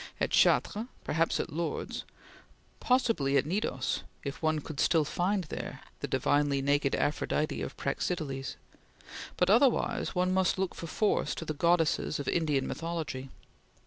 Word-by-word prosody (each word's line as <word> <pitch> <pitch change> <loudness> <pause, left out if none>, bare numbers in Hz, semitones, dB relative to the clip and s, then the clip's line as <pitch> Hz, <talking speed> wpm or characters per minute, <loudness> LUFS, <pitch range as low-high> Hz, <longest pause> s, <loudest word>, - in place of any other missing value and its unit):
At - - 0
Chartres 220 +3 +3 0.2
perhaps 165 +1 +1
at - - -3
Lourdes 170 +1 -3 0.7
possibly 225 - +2
at 140 - +2
Cnidos 195 +8 -1 0.2
if 140 -1 -5
one 155 -1 +2
could 150 0 -6
still 160 -3 +3
find 185 +5 0
there 155 - -6 0.2
the - - -3
divinely 145 -1 +2
naked 140 0 +2
Aphrodite 150 +1 0
of - - -5
Praxiteles 140 -2 -2 0.8
but 180 +1 +3
otherwise 240 -2 +3
one 180 +1 +2
must 190 -1 +2
look 190 -1 -1
for 165 - -7
force 210 +5 +1
to 165 - -5
the 155 - -2
goddesses 165 -1 +2
of 145 - -4
Indian 150 -5 +1
mythology. 160 -5 -4
160 Hz, 145 wpm, -30 LUFS, 145-180 Hz, 0.8 s, Chartres